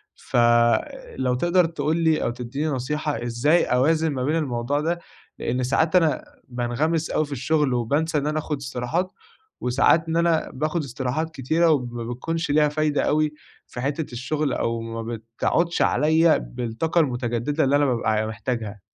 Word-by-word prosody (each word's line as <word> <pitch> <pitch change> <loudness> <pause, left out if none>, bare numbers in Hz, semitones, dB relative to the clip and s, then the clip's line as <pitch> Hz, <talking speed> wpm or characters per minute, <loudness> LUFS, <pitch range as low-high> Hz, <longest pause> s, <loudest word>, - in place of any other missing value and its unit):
فلو 120 - +1
تقدر 175 +6 +3
تقول 160 -1 -1
لي 160 -2 +2
أو - - +1
تديني 125 +5 -4
نصيحة، 145 0 -2
إزاي 120 +8 +2
أوازن 155 +5 +2
ما 130 -1 -2
بين 150 +4 +1
الموضوع 135 -2 -1
ده، 170 +2 -1 0.4
لأن 125 +1 -1
ساعات 160 +7 +1
أنا 165 -4 +3 0.2
بانغمس 130 +7 -1
أوي 155 - +1
في 145 - -14
الشغل، 140 +1 +1
وبانسى 145 +7 0
إن 145 +1 -1
أنا 155 0 0
آخد 150 -1 -3
استراحات، 140 +7 -2 0.5
وساعات 140 +6 +3
إن 165 +1 0
أنا 170 -1 +2
باخد 155 +4 -1
استراحات 135 +4 -3
كتيرة 160 +6 +2
وما 120 -5 -1
بتكونش 165 +6 -3
ليها 150 0 +4
فايدة 150 0 0
أوي 150 0 +1 0.3
في 125 - -7
حتة 145 +2 -2
الشغل، 145 +4 -1
أو 115 0 -1
ما 115 0 -5
بتعُودش 115 +9 -1
عليَّ 160 +4 +4
بالطاقة 125 +8 -1
المتجددة 125 +2 -1
اللي 140 +1 +3
أنا 145 0 +3
بابقى 120 -4 0
ع 110 0 +1
محتاجها. 110 -2 -4
145 Hz, 160 wpm, -24 LUFS, 120-160 Hz, 0.5 s, ليها